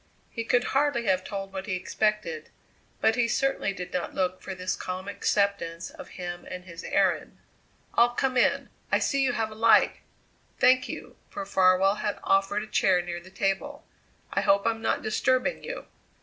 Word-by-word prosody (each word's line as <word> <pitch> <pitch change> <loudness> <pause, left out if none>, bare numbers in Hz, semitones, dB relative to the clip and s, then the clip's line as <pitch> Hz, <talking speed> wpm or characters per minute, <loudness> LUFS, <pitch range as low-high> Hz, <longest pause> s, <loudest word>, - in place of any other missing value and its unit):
He 230 - -3
could 245 +1 +2
hardly 270 -4 +2
have 185 -2 +2
told 195 0 -6
what 190 +1 -5
he 190 - -1
expected, 180 -3 -1 0.5
but 225 - +4
he 245 -2 +2
certainly 270 -3 0
did 180 -2 -7
not 180 - -3
look 185 -1 -1
for 190 - -6
this 185 0 -2
calm 185 +1 -5
acceptance 200 -4 -1
of - - -11
him 175 -1 -5
and 180 0 -7
his 170 -1 -9
errand. - - 0 0.6
"I'll 235 +1 +5
come 260 +2 -1
in. 250 - +2 0.2
I - - +5
see 275 -1 +1
you 255 -2 +2
have 220 -2 -1
a - - -7
light. 225 +1 +4 0.6
Thank 255 0 +4
you" - - -8
for 300 -1 -5
Farwell 190 -1 +4
had 205 -1 -1
offered 195 +2 +2
a - - -9
chair 185 -4 +3
near 175 0 -5
the 180 +2 -14
table 195 0 -2 0.5
"I - - +2
hope 200 0 +3
I'm 225 -1 0
not - - 0
disturbing 255 - +1
you." - - -6
200 Hz, 180 wpm, -27 LUFS, 185-235 Hz, 0.6 s, I'll